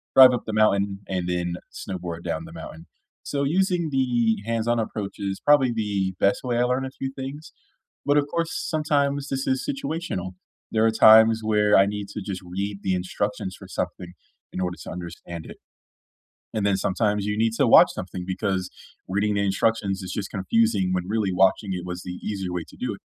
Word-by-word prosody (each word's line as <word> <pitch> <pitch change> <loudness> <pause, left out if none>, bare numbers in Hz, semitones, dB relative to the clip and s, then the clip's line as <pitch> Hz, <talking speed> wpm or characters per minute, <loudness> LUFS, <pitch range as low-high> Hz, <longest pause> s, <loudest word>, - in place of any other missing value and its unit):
drive 130 -1 +10
up 125 - -2
the 110 - -4
mountain, 100 -2 +2
and 90 -2 -2
then 90 -1 -1 0.2
snowboard 90 -3 -6
down 80 -2 -3
the 80 - -11
mountain. 80 0 -10 0.3
So, 140 -1 -2
using 175 +2 +1
the 120 -4 +2
hands-on 115 +1 0
approach 105 -2 -4
is 100 -1 -3
probably 140 -4 +4
the 100 -4 -1
best 100 - +3
way 125 -2 -1
I 120 - +3
learn 125 +2 0
a - - -4
few 135 0 -5
things, 135 +3 -7 0.5
but 145 +1 +3
of 145 - +3
course, 170 -1 0
sometimes 145 -2 0
this 135 -1 -2
is 130 - -1
situational. 165 - -3 0.4
There 110 0 +3
are - - +5
times 110 0 +7
where 105 -1 +4
I 95 - +6
need 100 0 -4
to 105 - -4
just 95 -2 -5
read 100 +3 -4
the 95 -2 0
instructions 95 +1 -3
for - - -11
something 90 -1 -4 0.4
in 95 - -3
order 90 -1 -2
to - - -8
understand 85 -1 -7
it, - - -10 1.0
and 110 -2 -1
then 100 -1 +2
sometimes 105 +1 0
you 105 0 -1
need 115 +1 +2
to - - +3
watch - - +8
something 90 0 -6
because 95 -1 -2 0.4
reading 105 +2 +1
the 100 - +1
instructions 100 0 0
is 95 -1 -6
just 100 0 -4
confusing 100 0 +1
when 90 -1 0
really 105 -3 0
watching 95 +2 +2
it 90 -1 -4
was 90 0 -5
the 90 - -6
easier 95 -4 -3
way 90 -2 -2
to - - -15
do - - -2
it. - - -12
105 Hz, 195 wpm, -24 LUFS, 95-120 Hz, 1.0 s, drive